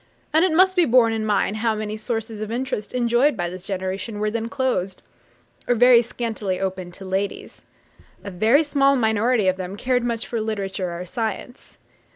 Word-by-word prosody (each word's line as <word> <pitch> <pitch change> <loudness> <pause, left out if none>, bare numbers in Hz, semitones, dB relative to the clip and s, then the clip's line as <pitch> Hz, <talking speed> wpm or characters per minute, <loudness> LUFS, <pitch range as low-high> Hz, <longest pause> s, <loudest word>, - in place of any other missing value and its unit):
And 320 +2 +5
it 370 - +3
must 375 +3 +4
be 355 -2 +4
borne 235 -3 +4
in 220 -1 -2
mind 210 0 +1
how 225 0 0
many 215 0 -4
sources 220 0 -4
of 215 - -4
interest 250 -2 -3
enjoyed 240 +2 +2
by 175 -1 -2
this 185 0 -9
generation 195 +3 -4
were 210 0 0
then 230 0 -3
closed, 230 -8 -2 0.6
or 245 - +3
very 245 0 +6
scantily 220 -5 -3
opened 185 -2 -4
to 195 - -10
ladies. 195 +1 -4 0.6
A 200 - -6
very 225 - +3
small 275 -2 +3
minority 220 -2 +2
of 185 0 +2
them 185 +1 -6
cared 250 +1 0
much 235 -1 -2
for 230 -2 -3
literature 195 -5 -3
or 180 - -6
science. 225 +4 -5
220 Hz, 185 wpm, -22 LUFS, 195-245 Hz, 0.6 s, very